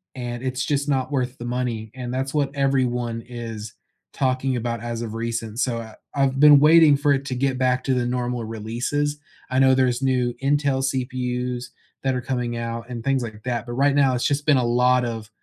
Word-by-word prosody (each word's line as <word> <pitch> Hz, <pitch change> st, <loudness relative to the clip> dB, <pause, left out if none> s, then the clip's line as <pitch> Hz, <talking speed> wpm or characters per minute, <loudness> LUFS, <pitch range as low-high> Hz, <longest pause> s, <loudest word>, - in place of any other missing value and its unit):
and 120 Hz, -1 st, -5 dB
it's 130 Hz, 0 st, -2 dB
just 145 Hz, 0 st, -1 dB
not 130 Hz, -1 st, 0 dB
worth 130 Hz, -1 st, -1 dB
the 120 Hz, -, -7 dB
money, 120 Hz, -3 st, -3 dB
and 125 Hz, -1 st, -5 dB
that's 135 Hz, +1 st, -2 dB
what 140 Hz, -2 st, 0 dB
everyone 125 Hz, -4 st, 0 dB
is 115 Hz, -3 st, -7 dB, 0.4 s
talking 130 Hz, -1 st, 0 dB
about 115 Hz, -1 st, -3 dB
as 120 Hz, -1 st, -4 dB
of 115 Hz, -2 st, -5 dB
recent, 115 Hz, -1 st, -4 dB
so, 125 Hz, -3 st, 0 dB
I 110 Hz, -1 st, -9 dB, 0.2 s
I've 135 Hz, -1 st, +1 dB
been 145 Hz, 0 st, +8 dB
waiting 155 Hz, 0 st, +7 dB
for 145 Hz, +1 st, +1 dB
it 135 Hz, -1 st, +1 dB
to 135 Hz, -, -3 dB
get 130 Hz, +1 st, 0 dB
back 130 Hz, 0 st, +1 dB
to 130 Hz, -, +2 dB
the 125 Hz, -1 st, 0 dB
normal 125 Hz, -1 st, -2 dB
releases, 120 Hz, +7 st, -2 dB, 0.3 s
I 130 Hz, -, -1 dB
know 130 Hz, 0 st, +6 dB
there's 130 Hz, -1 st, +2 dB
new 125 Hz, -2 st, +1 dB
Intel 140 Hz, -1 st, +1 dB
CPUs 125 Hz, -1 st, -2 dB, 0.4 s
that 135 Hz, -1 st, +1 dB
are 125 Hz, -, -2 dB
coming 125 Hz, -2 st, -2 dB
out 115 Hz, 0 st, -4 dB
and 120 Hz, -2 st, -6 dB
things 135 Hz, -1 st, +1 dB
like 110 Hz, -2 st, -7 dB
that, 120 Hz, -2 st, -2 dB
but 120 Hz, -, -7 dB
right 140 Hz, +3 st, +2 dB
now, 135 Hz, -2 st, +4 dB
it's 125 Hz, -, -1 dB
just 145 Hz, 0 st, 0 dB
been 150 Hz, -3 st, +5 dB
a 125 Hz, -, +2 dB
lot 125 Hz, +1 st, +3 dB
of 115 Hz, -2 st, -5 dB
125 Hz, 210 wpm, -23 LUFS, 120-135 Hz, 0.4 s, been